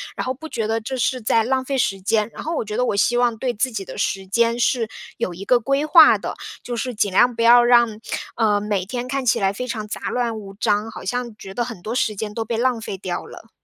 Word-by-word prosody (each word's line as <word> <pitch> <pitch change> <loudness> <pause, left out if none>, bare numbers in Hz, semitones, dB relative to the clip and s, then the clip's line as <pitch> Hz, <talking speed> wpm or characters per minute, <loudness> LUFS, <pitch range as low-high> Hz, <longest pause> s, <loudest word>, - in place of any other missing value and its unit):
然 - - -3
后 255 - -1
不 315 +4 -10
觉 225 -2 -2
得 225 +1 -1
这 260 +4 -4
是 255 0 0
在 225 +1 +2
浪 260 +2 0
费 270 +1 -2
时 195 -6 0
间。 210 +2 +1
然 - - -8
后 330 +1 -2
我 225 - -2
觉 210 - -5
得 250 +2 +1
我 205 - 0
希 240 +4 +2
望 240 -2 +2
对 250 0 -1
自 255 +4 -1
己 200 -3 -5
的 200 - -8
时 195 -1 -1
间 230 +4 +1
是 235 -2 +1 0.3
有 210 -6 -2
一 195 +3 -8
个 250 -1 +4
规 275 +5 0
划 320 0 +7
的， - - -5 0.3
就 245 - -4
是 240 0 -3
尽 205 -2 +1
量 240 +5 +4
不 230 - -2
要 240 +1 +7
让， 235 -3 +4 0.4
呃， 210 -3 +2
每 205 -3 -1
天 245 +4 -4
看 270 0 -2
起 230 - +3
来 195 -1 +2
非 250 +4 -5
常 215 -3 -4
杂 - - -4
乱 235 -3 -1
无 195 -1 -10
章， 210 +2 0
好 - - -9
像 240 +2 -3
觉 190 0 -10
得 240 - -1
很 230 -8 -8
多 220 - -4
时 220 -4 0
间 210 +1 -5
都 225 0 -3
被 230 0 -2
浪 250 -1 +1
费 200 - -5
掉 185 -2 -4
了。 - - -13
230 Hz, 290 characters per minute, -21 LUFS, 210-250 Hz, 0.4 s, 划